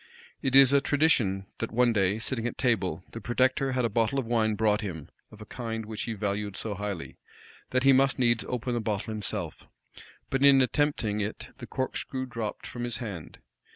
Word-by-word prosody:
It 130 0 0
is 135 0 +8
a 140 - +5
tradition, 130 -12 +2
that 115 - -3
one 120 0 +3
day, 100 -1 +2
sitting 115 +1 -1
at - - -6
table, 95 - 0
the 115 - -7
protector 130 +2 +1
had 125 -1 +1
a - - +3
bottle 115 +5 +1
of 135 - 0
wine 110 -2 +1
brought 105 0 +2
him, 85 -8 -6 0.2
of 110 - -14
a - - -8
kind 115 -2 -5
which 110 0 -5
he 115 - -3
valued 100 -1 -3
so 110 - -3
highly, 100 -3 -5 0.5
that 130 0 +1
he 135 0 +6
must 135 +1 +3
needs 120 -4 +2
open 125 0 -2
the 120 - -1
bottle 110 0 -2
himself; 100 -5 -4 0.6
but 135 +1 +1
in 140 -1 +7
attempting 130 -6 +1
it, 105 +1 -5
the 120 - -8
corkscrew 130 +1 -3
dropped 115 -4 -5
from 120 - -6
his 120 -3 -2
hand. 100 -9 -7
115 Hz, 195 wpm, -28 LUFS, 105-130 Hz, 0.6 s, is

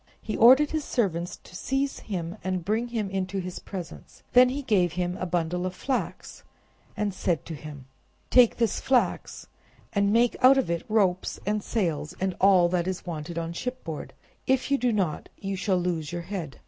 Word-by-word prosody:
He 215 - -4
ordered 265 +6 +7
his 310 -1 -1
servants 180 -9 -1
to - - -14
seize 270 +7 -1
him 175 -4 -4
and 185 -2 -2
bring 220 +4 0
him 225 -4 -2
into 190 0 -2
his 185 -1 -4
presence. 185 -4 -9
Then 250 0 +7
he 280 +3 -3
gave 185 -9 +2
him 180 0 -2
a 185 - -3
bundle 175 +1 -1
of 185 0 -3
flax, 265 +4 -3 0.6
and 210 -2 -1
said 175 -5 -1
to 165 - -6
him— 145 -3 -9 0.5
"Take 250 -3 +6
this 230 -4 +1
flax 260 -2 0 0.5
and 200 -1 +2
make 235 +2 +3
out 265 +2 +7
of 260 -10 +1
it 170 - -3
ropes 195 -4 +1
and 210 +1 0
sails 160 -10 -2
and 190 -1 -1
all 190 -3 +6
that 175 0 0
is 185 -1 -4
wanted 165 -1 -5
on 165 0 -3
shipboard; 210 - -5 0.3
if 265 +1 +1
you 280 - +3
do 245 -1 +2
not, 190 -8 -1
you 195 0 -4
shall 190 0 +1
lose 170 -4 -2
your 175 0 -4
head." 170 -6 -6
190 Hz, 185 wpm, -26 LUFS, 175-230 Hz, 0.6 s, ordered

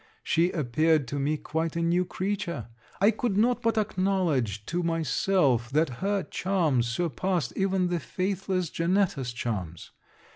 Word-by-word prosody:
She 170 +2 +2
appeared 155 -1 +1
to 140 - -2
me 150 +3 0
quite 160 +2 -3
a 170 - 0
new 175 +2 +2
creature. 175 - -3 0.3
I 200 +3 +5
could 225 -2 -1
not 240 +3 +3
but 230 -1 +1
acknowledge 180 - 0
to 175 +1 -1
myself, 155 -5 +1
that 145 -3 +1
her 200 0 0
charms 160 -11 0
surpassed 170 +3 -1
even 190 -2 +1
the 175 -1 0
faithless 185 0 -2
Janetta's 170 -7 0
charms. 95 -9 -4
170 Hz, 140 wpm, -27 LUFS, 135-190 Hz, 0.3 s, I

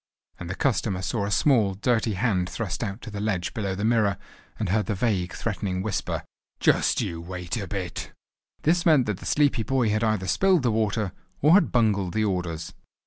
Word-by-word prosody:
and 90 - -6
the 95 - -3
customer 110 -7 0
saw 100 +2 -2
a - - -2
small, 105 - +3
dirty 110 +1 +1
hand 95 -3 0
thrust 105 -3 -3
out 100 +1 -5
to 110 - -7
the 105 - -5
ledge 100 -4 -1
below 100 -5 -2
the 100 +3 -2
mirror, 110 -3 +2 0.4
and 105 - -2
heard 105 +2 +1
the 105 - 0
vague, 95 -4 0
threatening 95 -4 -3
whisper. 105 -3 -2 0.4
"Just - - +3
you 85 -1 -4
wait 90 +2 -5
a 100 -4 -4
bit!" 95 -3 -5 0.5
This 170 +2 +3
meant 155 -7 +5
that 105 -3 -2
the - - -8
sleepy 145 -5 +2
boy 120 +1 +1
had 110 +1 +1
either 110 -4 +1
spilled 185 - +3
the 120 - +2
water, 105 -2 0 0.3
or 150 +3 +6
had 200 - +5
bungled 105 -6 +1
the 110 0 +2
orders. 90 -5 -3
105 Hz, 195 wpm, -25 LUFS, 95-115 Hz, 0.5 s, or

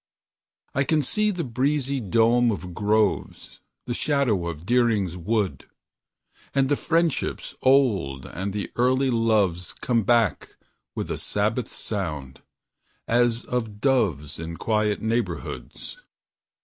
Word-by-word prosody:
I 140 - +2
can 150 +1 +1
see 210 +10 +1
the 180 -4 -2
breezy 135 +2 0
dome 115 +2 +3
of 90 -3 -5
groves, 105 +1 0 0.3
The 120 - -2
shadows 120 - +1
of 80 0 -8
Deering's 110 -6 +2
Woods; 100 +2 -1 0.9
And 135 -1 +3
the 145 - +3
friendships 165 0 0
old 105 - +2
and 95 +3 -4
the 100 +1 -4
early 130 +2 +3
loves 105 -7 +1
Come 120 -2 0
back 115 -1 +1 0.4
with - - -3
a - - -2
sabbath 110 +4 -1
sound, 75 -11 -5 0.7
as 120 0 +2
of 115 -4 -3
doves 100 - +1
In 85 0 -6
quiet 105 -2 0
neighborhoods. 115 - -3
115 Hz, 120 wpm, -25 LUFS, 95-130 Hz, 0.9 s, dome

